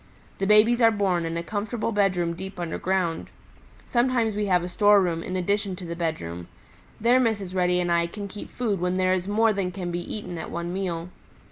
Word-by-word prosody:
The 195 - 0
babies 220 +4 +5
are 230 - +7
born 195 -6 0
in 165 0 -3
a 170 - -3
comfortable 215 +4 -3
bedroom 185 -5 +1
deep 190 +2 -8
underground. 175 0 -1 0.6
Sometimes 240 -3 +1
we 210 0 -1
have 180 -2 +3
a - - -3
storeroom 185 -3 +3
in 185 - -5
addition 200 +1 0
to 180 - -9
the 170 0 -5
bedroom; 90 - -4 0.5
there 240 +3 +4
Mrs. 205 -7 0
Reddy 180 -1 +2
and 175 -1 0
I 170 0 +2
can 200 +3 -7
keep 205 +1 -9
food 220 -6 -2
when 180 +1 0
there 185 0 +3
is 185 0 -1
more 220 +2 +3
than 195 -2 -2
can 180 -2 -4
be 175 - -2
eaten 175 -1 -6
at - - -6
one 170 +1 -4
meal. 180 -3 -3
185 Hz, 205 wpm, -25 LUFS, 175-210 Hz, 0.6 s, are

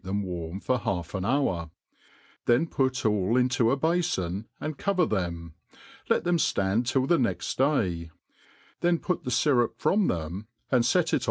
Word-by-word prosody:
them 100 +2 -2
warm. 90 -1 -5
for 125 +4 0
half 90 -6 -3
an 95 -2 -2
hour; 95 - 0 0.8
then 120 +6 +4
put 130 -6 -1
all 105 +2 +2
into 125 -2 +2
a 135 - +2
bafon, 135 - 0
and 155 -2 -5
cover 190 -4 +2
them, 85 - -3 0.6
let - - +2
them 175 0 +2
ftand 115 -7 +1
till 130 0 +2
*the 170 +4 +3
next 120 - -1
day; 95 - +1 0.7
then 175 0 +2
put 180 0 -2
the - - -2
fyrup 125 -1 +2
from 200 -1 +2
them, 85 +5 -3 0.2
and 125 -3 +3
fet - - +2
it. - - +4
120 Hz, 165 wpm, -27 LUFS, 95-145 Hz, 0.8 s, then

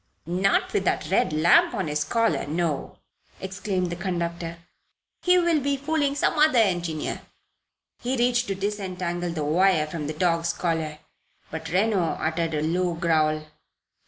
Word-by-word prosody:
"Not 195 - +1
with 410 - +1
that - - 0
red 245 - +2
lamp 165 +9 +4
on 190 -6 -2
his 150 0 0
collar 230 +1 0
no!" 155 -2 -2 0.4
exclaimed 190 -1 -2
the - - -2
conductor. 170 -2 -3 0.6
"He 360 0 +4
will 340 -3 +3
be 280 0 0
fooling 285 0 0
some 295 - +1
other 305 -4 +5
engineer 175 -7 0 0.4
" - - -59
He 255 +2 -1
reached 240 0 +2
to 195 - -2
disentangle 185 -3 -3
the 160 -3 -3
wire 165 +1 +3
from 155 -1 -5
the 155 - -3
dog's 170 0 +1
collar; 160 -3 -2 0.5
but 160 0 -5
Reno 195 +3 +2
uttered 165 0 -1
a 150 - -1
low 175 +2 0
growl. 155 -2 +1
175 Hz, 155 wpm, -25 LUFS, 160-220 Hz, 0.6 s, other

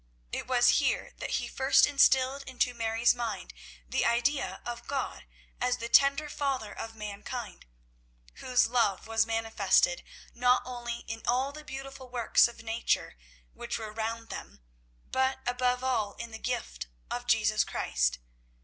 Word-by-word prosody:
It - - -4
was 245 -1 +5
here - - 0
that - - -4
he - - -3
first 265 +1 +4
instilled 275 -1 +4
into 250 -1 0
Mary's 230 0 +2
mind 225 -6 -4 0.3
the - - 0
idea 240 +5 +1
of 240 0 -6
God 275 -1 -3 0.3
as 250 0 +1
the 235 - -5
tender 280 +4 +5
Father 270 -7 -2
of 225 0 -7
mankind, 210 - -7 0.7
whose 250 0 +2
love 225 -5 +1
was 225 0 +1
manifested 225 - +2 0.3
not 250 +1 +3
only 240 -1 -5
in 225 0 -5
all 260 +3 +2
the 305 +1 -10
beautiful 270 -2 -8
works 240 -1 +4
of 235 -1 -11
nature, 225 - -1 0.4
which - - -4
were 215 -2 -7
round 225 +1 -4
them, 65 - -8 0.5
but 260 0 +1
above 250 0 0
all 230 -6 0
in 235 0 -8
the 220 - -8
gift 240 - -4 0.2
of - - -4
Jesus - - +3
Christ. - - 0
240 Hz, 150 wpm, -29 LUFS, 225-260 Hz, 0.7 s, was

